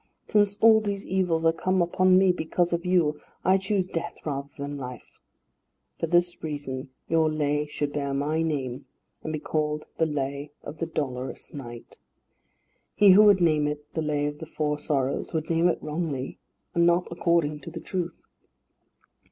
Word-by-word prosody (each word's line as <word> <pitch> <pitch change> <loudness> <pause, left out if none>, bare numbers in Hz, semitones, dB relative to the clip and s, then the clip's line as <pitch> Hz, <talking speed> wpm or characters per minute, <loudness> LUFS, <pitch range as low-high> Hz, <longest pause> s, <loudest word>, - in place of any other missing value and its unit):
Since 205 -1 +2
all 220 -1 +7
these 200 -1 -3
evils 180 -4 0
are 165 - +5
come 185 +3 0
upon 185 +1 +4
me 190 -1 +5
because 175 0 0
of 170 0 -1
you, 165 -5 +2 0.3
I 190 +1 +5
choose 190 -1 0
death 170 -1 -4
rather 140 -2 -3
than 140 0 -4
life. 125 -2 -9 0.8
For 165 - -1
this 175 +1 +2
reason 145 -4 -4 0.2
your 160 -1 +3
Lay 150 -1 0
should 145 -1 -3
bear 140 -1 -2
my 145 +4 0
name, 140 -5 -2 0.4
and 155 - -3
be 155 - -2
called 150 0 -2
the 160 - +3
Lay 140 -1 -3
of 150 +2 -8
the 165 - -1
Dolorous 130 -5 -4
Knight. 120 -4 -9 1.0
He 205 -2 +7
who 195 +3 +8
would 200 -3 +6
name 155 -3 +3
it 150 0 -6
the 160 - -1
Lay 150 -1 0
of 145 0 -4
the 160 - -7
Four 150 -1 -2
Sorrows 140 -1 -1
would 160 0 -2
name 165 +1 +3
it 175 - +1
wrongly, 150 -4 -3 0.3
and 170 0 +4
not 175 +1 +3
according 170 -3 +1
to 150 - -9
the 165 0 -7
truth." 175 -1 -4
155 Hz, 175 wpm, -26 LUFS, 145-175 Hz, 1.0 s, who